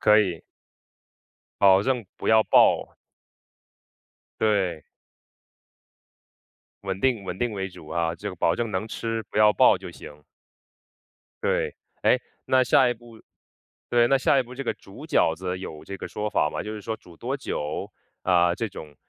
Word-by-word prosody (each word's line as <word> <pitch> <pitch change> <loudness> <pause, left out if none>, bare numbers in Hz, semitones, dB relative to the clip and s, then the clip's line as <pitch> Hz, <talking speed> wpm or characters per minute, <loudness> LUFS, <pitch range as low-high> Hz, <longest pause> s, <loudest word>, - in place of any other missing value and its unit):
可 105 0 +6
以。 90 -6 -2 1.2
保 95 0 +6
证 125 -3 0
不 - - -4
要 110 0 +6
爆。 - - +4 1.5
对。 100 -7 +1 2.0
稳 95 -1 -3
定 125 -4 +1
稳 90 0 -5
定 120 -2 -1
为 95 -1 -3
主， 90 -4 -13
啊。 85 -1 -1
这 105 +4 -6
个 95 - -6
保 85 +1 +2
证 115 -2 -2
能 95 +3 -2
吃， 115 0 -3
不 - - -2
要 105 0 +6
爆 - - +5
就 - - -8
行。 75 0 -12 1.2
对。 - - 0 0.3
诶， - - +4 0.3
那 130 0 +4
下 130 +1 +5
一 120 - 0
步 115 -1 -16 0.7
对， 120 -1 +4
那 135 - +5
下 135 +2 +3
一 130 - +3
步， 125 +1 -12
这 140 - -5
个 - - 0
煮 100 +10 -13
饺 80 - +3
子 90 +1 -4
有 80 -5 -8
这 100 - -7
个 - - -7
说 105 0 -3
法 75 - +2
吗？ - - -4
就 105 - -6
是 105 - -7
说 110 +2 -4
煮 85 -5 -17
多 130 +8 -3
久？ 75 - -4 0.3
啊， 90 -1 +3
这 115 +2 -3
种， 75 -5 -10
105 Hz, 180 characters per minute, -25 LUFS, 90-120 Hz, 2.0 s, 可